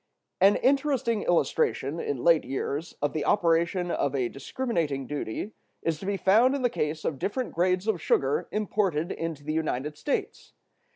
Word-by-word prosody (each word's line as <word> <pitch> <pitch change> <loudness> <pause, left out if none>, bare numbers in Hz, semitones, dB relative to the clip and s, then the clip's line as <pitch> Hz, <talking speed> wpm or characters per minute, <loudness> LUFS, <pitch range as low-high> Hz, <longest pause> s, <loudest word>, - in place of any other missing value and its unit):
An 195 +2 +6
interesting 265 -5 +1
illustration, 160 -3 +1
in 135 -6 -3
late 170 -2 +5
years, 140 +4 -3
of 145 - +1
the 155 - -1
operation 170 -1 +2
of 140 -4 0
a 125 -3 0
discriminating 150 - -2
duty 145 - -4 0.3
is 160 -2 -1
to 190 - -7
be 200 -1 0
found 225 +9 +4
in 275 - -3
the 245 - +2
case 155 -7 -2
of 140 -4 -2
different 245 - -2
grades 180 +2 +1
of 200 -7 0
sugar 135 -1 +1
imported 195 -6 0
into 165 -3 -4
the 155 +1 -3
United 150 -2 -2
States. 290 - -3
170 Hz, 165 wpm, -27 LUFS, 150-205 Hz, 0.3 s, An